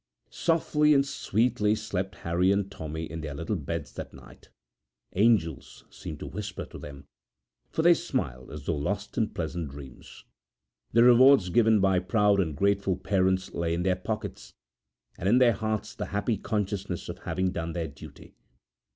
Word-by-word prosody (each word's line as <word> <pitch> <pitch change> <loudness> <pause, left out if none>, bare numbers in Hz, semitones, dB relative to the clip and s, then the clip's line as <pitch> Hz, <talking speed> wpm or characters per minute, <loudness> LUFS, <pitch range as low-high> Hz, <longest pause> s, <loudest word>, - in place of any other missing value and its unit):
Softly 150 -2 +2
and 140 0 +4
sweetly 115 -5 +1
slept 105 -3 -4
Harry 90 +3 +2
and 100 0 0
Tommy 80 -3 -5
in 80 0 -6
their 75 -2 -5
little 85 +8 -2
beds 75 -7 -5
that - - -8
night. - - -16 0.6
Angels 95 - +1
seemed - - -8
to - - -5
whisper 100 -2 -6
to - - -11
them, 70 -1 -10 0.6
for 160 - -1
they 175 +1 +8
smiled 70 - -3
as 75 -1 -8
though 85 - 0
lost 100 +8 -3
in 110 -1 +1
pleasant 80 -3 -4
dreams. 65 -2 -12 0.7
The 115 - +5
rewards 125 -4 +7
given 110 +2 +4
by 95 -1 +3
proud 100 +2 +2
and 80 -7 -1
grateful 100 0 +2
parents 95 -1 0
lay 85 0 -1
in 85 - -2
their 95 0 +2
pockets, 90 - -6 0.6
and 95 - 0
in 120 - +5
their 125 -2 +5
hearts 110 +1 -3
the - - -5
happy 100 +3 -1
consciousness 100 -1 -3
of - - -7
having 95 0 -1
done 85 -2 -4
their 85 -2 -2
duty. 70 - -13
95 Hz, 165 wpm, -27 LUFS, 85-110 Hz, 0.7 s, they